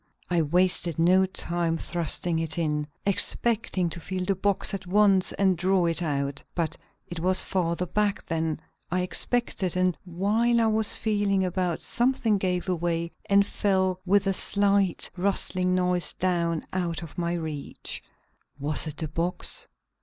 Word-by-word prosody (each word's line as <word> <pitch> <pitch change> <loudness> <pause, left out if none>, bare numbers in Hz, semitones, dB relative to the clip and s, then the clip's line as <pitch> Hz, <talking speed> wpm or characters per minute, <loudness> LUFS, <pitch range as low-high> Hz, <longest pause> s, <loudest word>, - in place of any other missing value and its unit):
I 175 -2 +3
wasted 175 +1 +1
no 185 +3 +4
time 170 -2 -1
thrusting 170 0 0
it 160 +1 -2
in, 150 -3 -1 0.2
expecting 200 -1 +1
to 170 - -4
feel 185 +2 -4
the 195 - +2
box 200 +1 +1
at 190 -2 -5
once 195 -1 +3
and 190 -2 +2
draw 185 +1 +2
it 170 +1 +1
out. 140 -3 -2
But 170 -2 -1 0.3
it 175 - -6
was 185 +2 +5
farther 175 -1 -1
back 205 +3 -1
than 160 -1 -2 0.3
I 180 +1 +1
expected, 185 -1 0
and 185 -1 +2
while 210 +7 +1
I 230 - +3
was 220 -1 +4
feeling 205 -3 +1
about 180 -2 -2
something 240 -4 +1
gave 180 -1 -1
way 170 -1 -1 0.2
and 200 0 +5
fell 190 -2 0
with 200 +2 +2
a 195 - +1
slight, 200 -1 +1
rustling 185 -1 0
noise 180 -2 0
down 170 -3 -1
out 175 -2 -2
of 165 +2 -9
my 170 0 -1
reach. 155 -4 -4 0.6
Was 145 +2 0
it 150 -1 -6
the 160 - -2
box? 165 +4 -3
180 Hz, 155 wpm, -26 LUFS, 170-195 Hz, 0.6 s, was